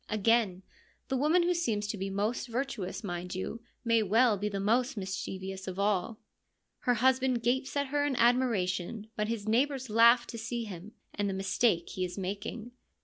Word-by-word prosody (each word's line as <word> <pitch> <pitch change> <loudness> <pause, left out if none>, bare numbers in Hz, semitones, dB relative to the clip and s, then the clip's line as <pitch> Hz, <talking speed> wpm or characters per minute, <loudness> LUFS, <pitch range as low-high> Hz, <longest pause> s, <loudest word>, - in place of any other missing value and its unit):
Again, 215 -3 +2 0.5
the 265 - 0
woman 310 +7 +3
who 355 +1 +2
seems 225 -12 -1
to - - -1
be 195 0 -3
most 210 +6 -1
virtuous, 235 -6 -3
mind 180 -1 -4
you, 205 +5 -4 0.2
may 230 -1 +4
well 220 +3 +4
be 205 +1 -2
the 200 -1 -3
most 235 +5 +1
mischievous 190 0 -5
of 185 0 -5
all. 200 +1 0 0.6
Her 245 - +1
husband 260 -1 +2
gapes 260 +4 0
at 280 -1 0
her 290 +1 +1
in 290 -2 0
admiration, 220 -4 +1
but 210 0 -1
his 220 -2 -3
neigh 240 +6 +4
bours 265 -5 -6
laugh 235 +2 +6
to 230 - -7
see 235 +1 -3
him, 200 0 -9 0.2
and 205 -1 -1
the 190 - -2
mistake 190 -1 +1
he 185 - -3
is 180 +1 -4
making. 205 +5 -5
220 Hz, 185 wpm, -30 LUFS, 195-245 Hz, 0.6 s, laugh